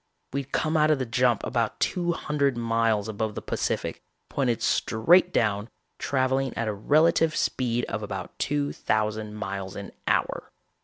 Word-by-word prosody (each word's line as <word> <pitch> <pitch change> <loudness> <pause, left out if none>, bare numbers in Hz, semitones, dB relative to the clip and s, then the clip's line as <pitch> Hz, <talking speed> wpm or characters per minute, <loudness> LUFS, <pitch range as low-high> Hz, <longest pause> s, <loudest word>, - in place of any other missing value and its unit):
We'd 140 -1 -3
come 155 +1 0
out 155 0 +4
of 155 - +4
the 130 - -2
jump 120 -1 +2
about 115 -2 -1
two 175 -2 +1
hundred 140 -5 0
miles 115 -2 +1
above 110 0 -3
the - - -4
Pacific, - - -2 0.3
pointed 120 -4 0
straight 175 +12 +4
down, 105 - 0 0.3
traveling 130 0 0
at 115 - -1
a 105 - 0
relative 155 +8 +3
speed 120 -2 0
of 110 - -4
about 95 -3 -6
two 145 0 0
thousand 105 0 -1
miles 100 -2 -5
an 100 - -7 0.2
hour. - - 0
120 Hz, 155 wpm, -26 LUFS, 110-140 Hz, 0.3 s, out